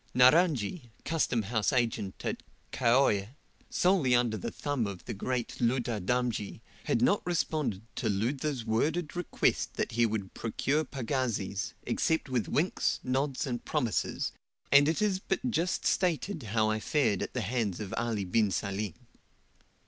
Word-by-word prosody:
Naranji, 130 - +4 0.2
custom 150 -8 +1
house 105 -1 0
agent 115 -6 -1
at - - -2 0.3
Kaoie, 120 -3 +2 0.3
solely 175 -9 +3
under 120 -2 +2
the 100 - -4
thumb 140 -7 -2
of 100 -3 -7
the - - -4
great 120 +3 -3
Ludha 120 -3 +1
Damji, 120 -1 -1 0.3
had 115 - +1
not 200 +9 +4
responded 155 - -1
to 115 - 0
Ludha's 125 +5 -1
worded 150 +10 0
request 175 -1 0
that - - -1
he 120 +1 +3
would 105 -4 -4
procure 135 +7 0
pagazis, 120 -8 -2
except 160 -3 0
with 125 -4 0
winks, 170 +5 +1
nods, 135 +2 0
and 120 -3 -3
promises, 115 -3 -1 0.4
and 140 +1 +7
it 165 +6 +1
is 195 -3 +1
but 220 +6 -1
just 175 -3 0
stated 180 0 +1
how 110 -1 +1
I 110 - 0
fared 115 -6 +1
at - - -4
the 125 - 0
hands 110 -3 -1
of 100 -3 -5
Ali 115 -4 -1
bin 105 +3 +2
Salim. 100 +1 -2
120 Hz, 150 wpm, -30 LUFS, 110-145 Hz, 0.4 s, and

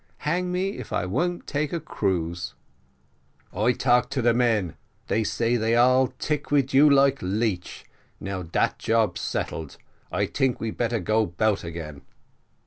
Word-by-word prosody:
Hang 180 +4 0
me 190 +2 -2
if - - -8
I - - 0
won't 175 - -1
take 145 0 -2
a 170 - -1
cruise." 90 - -2 1.0
"I 125 - +2
talk 125 +1 +2
to 130 -4 -2
the 120 0 +4
men, 115 -8 +1 0.3
they 110 - +1
say 115 +3 0
thay 115 +1 +1
all 130 +2 +5
tick 150 +2 -2
to 145 -2 +3
you 145 +3 +6
like 140 -1 +4
leech. 95 -1 -2 0.3
Now 100 -1 -4
dat 85 -1 -1
job 110 -6 +1
settled, 80 -3 -4 0.3
I - - +1
tink 130 -2 0
we 110 0 -3
better 115 0 -1
go 110 +3 +1
'bout 100 +4 0
again." 80 -4 -7
115 Hz, 155 wpm, -25 LUFS, 95-135 Hz, 1.0 s, you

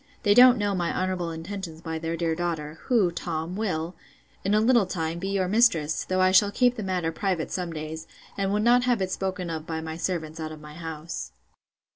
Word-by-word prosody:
They 205 -2 +5
don't 250 +2 +8
know 205 -1 0
my 175 -3 0
honourable 185 -2 -1
intentions 165 0 -6
by 160 -1 -4
their 165 +1 -3
dear 165 -1 0
daughter; 160 -2 -3
who, 220 -9 +3
Tom, 170 0 -4
will, 180 -5 -2 0.5
in 200 +2 +2
a - - +5
little 230 -2 +4
time, 165 -2 -3
be 190 - -3
your 195 -2 0
mistress; 190 -8 +2
though 185 0 0
I 185 0 +5
shall 200 +2 +6
keep 245 +3 +3
the 220 - -5
matter 180 -4 -1
private 180 -1 -2
some 180 -2 -3
days, 160 0 -6 0.3
and 195 -1 -1
would 210 +1 +1
not 245 +2 +5
have 240 -6 +2
it 185 - -3
spoken 185 -2 -3
of 160 -1 -5
by 160 -1 -3
my 160 0 -5
servants 165 -3 -3
out 155 -1 -4
of 155 - -9
my 150 0 -11
house. 160 0 -6
175 Hz, 215 wpm, -26 LUFS, 160-200 Hz, 0.5 s, don't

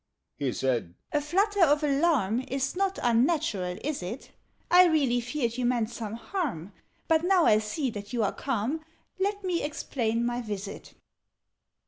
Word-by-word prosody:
He 135 -3 -1
said 120 -10 -1 0.2
"A 295 - +1
flutter 390 +6 +2
of 295 -1 +4
alarm 275 - +2
Is 270 +3 -2
not 390 0 0
unnatural, 235 - +1
is 295 -5 -2
it? 210 +9 -7 0.4
I 360 +1 +8
really 275 -7 +2
feared 245 -1 -2
you 250 - 0
meant 240 -2 0
some 225 -3 -5
harm: 225 - -4 0.3
But, 320 0 +3
now 365 -1 +4
I 215 - +5
see 235 +5 -2
that 205 0 -8
you 240 -3 0
are 200 - 0
calm, 270 +4 -2 0.4
Let 405 +1 -1
me 360 -2 0
explain 235 -6 -1
my 240 +1 -1
visit. 205 -3 -7
250 Hz, 155 wpm, -28 LUFS, 220-320 Hz, 0.4 s, I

